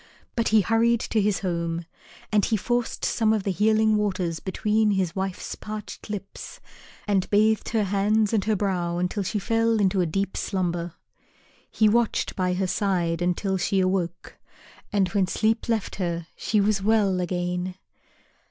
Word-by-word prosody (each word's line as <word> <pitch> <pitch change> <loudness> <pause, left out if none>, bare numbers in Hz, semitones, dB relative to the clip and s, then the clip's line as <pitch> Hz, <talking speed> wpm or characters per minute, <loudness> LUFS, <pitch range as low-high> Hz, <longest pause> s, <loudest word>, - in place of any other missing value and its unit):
But 230 -2 +1
he 220 -1 +5
hurried 230 +2 +2
to 220 - 0
his 205 -1 +1
home, 170 -2 -2 0.5
and 210 -1 +3
he 220 - +1
forced 240 +3 -1
some 220 -2 +2
of 215 -3 0
the 195 - 0
Healing 215 +2 +3
Waters 185 -5 -1
between 210 +3 +1
his 190 -4 0
wife's 190 -1 -3
parched 215 0 -8
lips, 200 -2 -7 0.5
and 195 -2 +1
bathed 215 +1 +2
her 220 -2 +1
hands 205 +2 +1
and 210 -3 +2
her 215 0 +2
brow 180 -4 -1
until 180 +3 -1
she 195 +3 -2
fell 225 +2 +1
into 190 -1 +2
a 175 - +1
deep 195 +4 -2
slumber. 175 -3 -2 0.7
He 215 - +3
watched 230 +1 +1
by 180 -1 0
her 190 +1 0
side 175 -3 0
until 185 +2 0
she 190 +2 +1
awoke, 185 -2 -2 0.5
and 200 -2 +2
when 195 -1 +1
sleep 220 +5 0
left 225 -4 -1
her 170 -3 -2
she 215 - 0
was 200 0 +2
well 200 -3 +2
again. 180 0 -2
195 Hz, 160 wpm, -25 LUFS, 180-215 Hz, 0.7 s, he